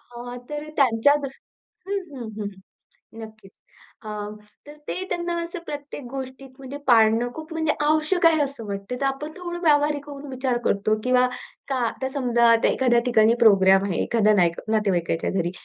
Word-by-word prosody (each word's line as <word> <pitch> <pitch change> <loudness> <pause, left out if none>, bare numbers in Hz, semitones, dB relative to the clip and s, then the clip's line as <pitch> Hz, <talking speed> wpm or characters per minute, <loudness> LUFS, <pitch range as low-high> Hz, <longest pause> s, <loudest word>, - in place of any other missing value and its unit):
अ, 245 +1 -7
तर 295 0 -4
त्यांच्या 265 0 +4
दृष्टी 270 -1 -9 0.5
हं, 305 -9 -8
हं, 225 - -6
हं. 205 - -2 0.8
नक्कीच. 215 -3 -12 0.5
अ, - - -7 0.6
तर 295 +1 -11
ते 370 - -3
त्यांना 345 -1 -2
असं 340 +2 -6
प्रत्येक 290 -1 -7
गोष्टीत 265 0 -7
म्हणजे 270 +1 -8
पाळणं 230 -1 +4
खूप 315 +1 -9
म्हणजे 320 -1 0
आवश्यक 310 +4 +2
आहे 320 -2 +4
असं 275 -5 -4
वाटतं. 200 +4 -5
तर - - 0
आपण 275 +3 -3
थोडं 350 -1 -5
व्यावहारिक 295 -2 +2
होऊन 285 0 -8
विचार 260 -1 -1
करतो 215 +2 +1
किंवा 250 0 +4 0.4
का 275 - -1
आता 265 +3 -4
समजा 240 -4 +2
आता 230 - +3
एखाद्या 245 -2 +2
ठिकाणी 225 -2 +4
प्रोग्राम 195 -3 +6
आहे, 190 -4 -1
एखाद्या 215 -2 +2
नाईक 170 -4 +2
नातेवाईकाच्या 190 -7 0
घरी. 175 -3 -1
255 Hz, 165 wpm, -24 LUFS, 220-295 Hz, 0.8 s, प्रोग्राम